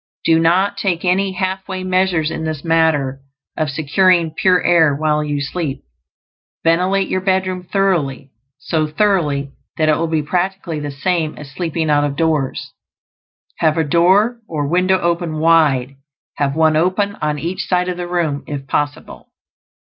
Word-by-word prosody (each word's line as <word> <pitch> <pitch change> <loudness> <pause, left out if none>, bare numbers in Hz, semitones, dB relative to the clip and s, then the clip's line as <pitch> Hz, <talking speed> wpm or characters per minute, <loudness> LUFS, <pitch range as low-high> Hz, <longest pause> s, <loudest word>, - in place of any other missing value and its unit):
Do 165 -1 +4
not 185 +5 +2
take 185 -3 -1
any 190 +2 +1
half 190 +1 -3
way 185 -1 -4
measures 185 -4 +1
in - - -4
this 155 -2 -4
matter 160 -5 +1 0.3
of 155 -1 -1
securing 165 +4 +2
pure 180 +1 +2
air 160 -4 +4
while 150 0 0
you 145 -1 -2
sleep. 145 -1 -4 0.8
Ventilate 185 +4 +2
your 185 - -1
bedroom 185 -1 0
thoroughly; 155 -9 0 0.3
so 155 +2 -1
thoroughly 150 -6 0 0.3
that 155 -1 +2
it 155 - +3
will 165 - -1
be 160 -2 -1
practically 180 0 -2
the 145 0 -4
same 155 +2 -2
as 145 -2 -10
sleeping 160 -1 -2
out 145 0 +3
of 145 -1 -2
doors. 155 -4 -1 0.9
Have 160 0 +2
a 160 - +2
door 190 +10 +3
or 150 -3 -2
window 185 +4 +2
open 170 -2 -1
wide; 150 -5 +2 0.4
have 140 -1 0
one 160 -1 +3
open 185 +5 0
on 150 0 -1
each 170 +5 -4
side 180 -1 +1
of 180 -1 -3
the 175 0 -4
room, 165 -5 -1
if 140 -2 -5
possible. 145 +1 -3
165 Hz, 160 wpm, -18 LUFS, 150-185 Hz, 0.9 s, Do